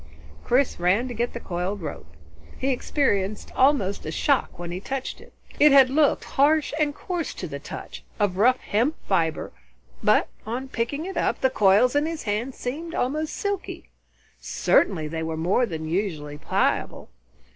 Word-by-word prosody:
Chris 255 -3 +1
ran 190 +8 +2
to 245 - -5
get 240 +1 -2
the 235 - -5
coiled 185 +1 -3
rope. 160 - -7 0.5
He 270 - -1
experienced 215 -6 0
almost 255 -8 +2
a 155 - -4
shock 280 - +1
when 175 0 -6
he 180 - -4
touched 265 +6 -5
it. - - -16 0.3
It 295 0 +7
had 270 -2 +7
looked 295 +1 +3
harsh 295 +2 +2
and 295 -1 +1
coarse 350 -3 -4
to - - -5
the - - -6
touch, - - -8 0.2
of 200 -3 +1
rough 250 +5 +5
hemp 245 +10 +1
fibre, 165 -5 0 0.5
but - - +4 0.2
on 250 +5 -4
picking 265 +6 -2
it 385 - -5
up, - - 0
the 260 - +3
coils 210 +4 +4
in 295 +2 +2
his 325 -1 -4
hand 225 +5 -2
seemed 320 +7 -5
almost 305 +5 -1
silky. 405 -2 -4 0.5
Certainly 160 -6 +1
they 160 +1 -4
were 160 0 -3
more 185 +9 +2
than 160 -4 -5
usually 160 -5 -2
pliable. - - -1
240 Hz, 165 wpm, -25 LUFS, 190-280 Hz, 0.5 s, It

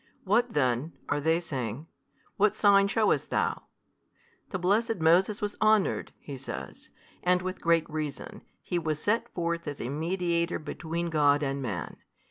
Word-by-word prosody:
What 230 +5 +2
then 130 +2 +1 0.2
(are 145 - 0
they 160 +3 +2
saying) 135 -5 -4 0.5
What 210 +1 +3
sign 200 -2 +5
shewest 215 +2 +1
THOU? - - 0 0.9
The 190 - -2
blessed 215 +6 +2
Moses 180 +5 +3
was 205 0 -2
honoured 215 -2 +3
(he 140 -2 -8
says) 70 - -8 0.3
and 180 0 +2
with 185 0 -4
great 165 -1 +3
reason, 155 -3 -5 0.2
he 175 - -1
was 155 -2 -1
set 230 +6 0
forth 170 -1 -2
as 145 -1 -5
a 120 - -3
mediator 170 +3 0
between 170 +2 -4
God 145 -1 +3
and 140 0 -2
man. 110 -9 -4
170 Hz, 150 wpm, -28 LUFS, 145-195 Hz, 0.9 s, sign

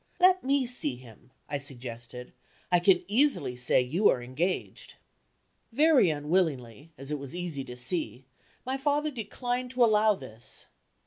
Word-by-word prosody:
"Let 370 0 +5
me 275 0 +2
see 235 - -1
him," 125 -1 -16 0.2
I 145 - -3
suggested; 125 -2 -9 0.4
"I 175 - +5
can 180 0 +4
easily 240 - +2
say 125 +1 +2
you 165 +12 +2
are - - +2
engaged." 155 +10 -3 0.8
Very 285 - +4
unwillingly, 150 -4 -1
as 135 +2 -7
it 150 - -2
was 140 +2 -8
easy 170 -6 -4
to 125 -1 -9
see, 130 0 -2 0.4
my 260 +1 -2
father 295 +2 0
declined 245 +1 -4
to 250 0 +2
allow 215 -1 +4
this. 120 - -4
170 Hz, 145 wpm, -28 LUFS, -, 0.8 s, Let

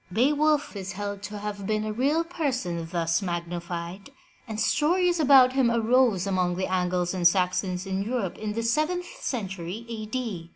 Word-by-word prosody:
Beowulf 290 +6 +2
is 195 -1 -5
held 200 +1 -5
to 205 +1 -6
have 205 -1 -5
been 215 0 0
a 215 - -2
real 285 +8 +1
person 250 - -2
thus 170 -1 +1
magni 175 -2 -3
fied, 170 +5 -6 0.4
and 220 -1 -5
stories 350 +7 +2
about 265 -4 +6
him 265 -3 +3
arose 235 -4 +3
among 185 -2 0
the 185 +1 -1
Angles 180 -1 0
and 180 -2 +4
Saxons 185 +1 0
in 190 0 -2
Europe 210 -3 -2
in 210 -1 -3
the 230 +1 -2
seventh 310 +9 0 0.2
century 195 -2 -4
A. 220 -2 -5
D. 215 -8 -4
205 Hz, 170 wpm, -26 LUFS, 180-255 Hz, 0.4 s, about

